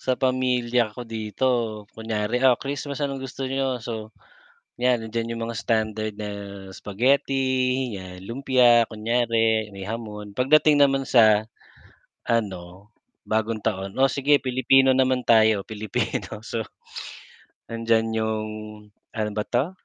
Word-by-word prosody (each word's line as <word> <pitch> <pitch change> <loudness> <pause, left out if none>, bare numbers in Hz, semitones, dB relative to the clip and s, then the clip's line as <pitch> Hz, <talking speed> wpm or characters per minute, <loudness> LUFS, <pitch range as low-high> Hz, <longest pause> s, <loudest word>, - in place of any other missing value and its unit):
Sa 130 -1 0
pamilya 125 -3 +1
ko 125 - -6
dito, 115 +2 -2 0.4
kunyari, 110 +1 -2
ah, 130 -2 +5
Christmas 140 +1 -5
anong 140 -1 -2
gusto 135 +1 -5
niyo, 135 -1 -1
so, 110 -1 -5 0.7
yan 125 -1 +3
nandiyan 115 +1 -3
yung 115 - -3
mga 115 - -5
standard 110 -1 -1
na 105 -1 -5 0.4
spaghetti 130 +2 0
yan, 90 0 -10
lumpia, 120 -1 +4
kunyari 115 -1 +1
may 95 -1 -8
hamon, 105 -1 -6
pagdating 150 +3 +4
naman 135 -1 +4
sa 110 -3 +5 0.8
ano, 100 -3 -3 0.4
bagong 110 0 0
taon, 95 +1 -2
o 135 - +6
sige 145 +1 +3
Pilipino 130 +1 +4
naman 130 -1 +2
tayo, 110 -3 +5
Pilipino 110 0 -3
so, 115 0 -4 1.1
nandiyan 115 0 +1
yung, 110 -1 -1 0.7
ano 110 -1 -1
ba 105 - 0
'to, 130 +8 0
115 Hz, 125 wpm, -24 LUFS, 110-130 Hz, 1.1 s, o